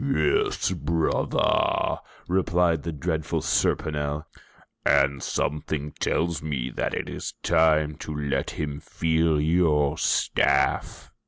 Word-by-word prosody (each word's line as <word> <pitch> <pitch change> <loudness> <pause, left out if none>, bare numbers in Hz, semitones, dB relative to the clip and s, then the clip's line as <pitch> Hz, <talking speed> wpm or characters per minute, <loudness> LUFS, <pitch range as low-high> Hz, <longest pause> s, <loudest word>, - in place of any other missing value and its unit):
"Yes, 80 - +1
brother," 80 +2 +1 0.3
replied 90 -3 +2
the 85 - -4
dreadful 80 0 -2
Serponel. 75 0 0 0.6
"And 70 0 +3
something 75 0 -2
tells 85 -2 0
me 70 -5 -3
that - - -2
it - - -3
is - - -6
time 75 -2 +3
to 80 - -7
let 75 -2 -2
him 75 -1 -4
feel 80 -1 +1
your 75 -2 +2
staff." 70 -1 +1
75 Hz, 105 wpm, -25 LUFS, 75-80 Hz, 0.6 s, And